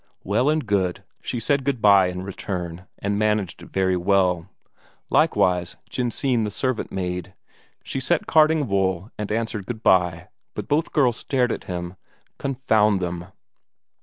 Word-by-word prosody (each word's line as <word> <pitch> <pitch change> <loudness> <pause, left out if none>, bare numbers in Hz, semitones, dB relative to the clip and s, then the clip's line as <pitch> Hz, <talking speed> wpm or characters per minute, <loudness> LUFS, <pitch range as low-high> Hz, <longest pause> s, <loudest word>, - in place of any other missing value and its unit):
Well 110 +8 +2
and 155 -2 +1
good, 95 -4 0 0.2
she 120 - -3
said 140 +4 +1
good 135 -2 0
bye 100 -3 +6
in 90 0 -4
return, 90 -2 -5
and 100 +1 -1
managed 105 -4 0
it - - -12
very 95 -1 +1
well. 90 -2 +2 0.6
Likewise 90 -1 +2
Jensine 125 0 0
the 105 - -1
servant 130 +3 -2
maid, 90 -1 -4 0.5
she - - -4
sat 155 +5 +1
carding 155 -2 +4
wool 95 0 0
and 105 -1 -3
answered 110 -3 -2
good 115 -2 -5
bye 90 -1 +3 0.3
but - - -5
both 155 +3 +1
girls 125 -7 +3
stared 125 -3 0
at - - -4
him, 90 0 -5 0.4
confound 110 -7 +2
them! 90 -1 -4
100 Hz, 150 wpm, -23 LUFS, 90-125 Hz, 0.6 s, bye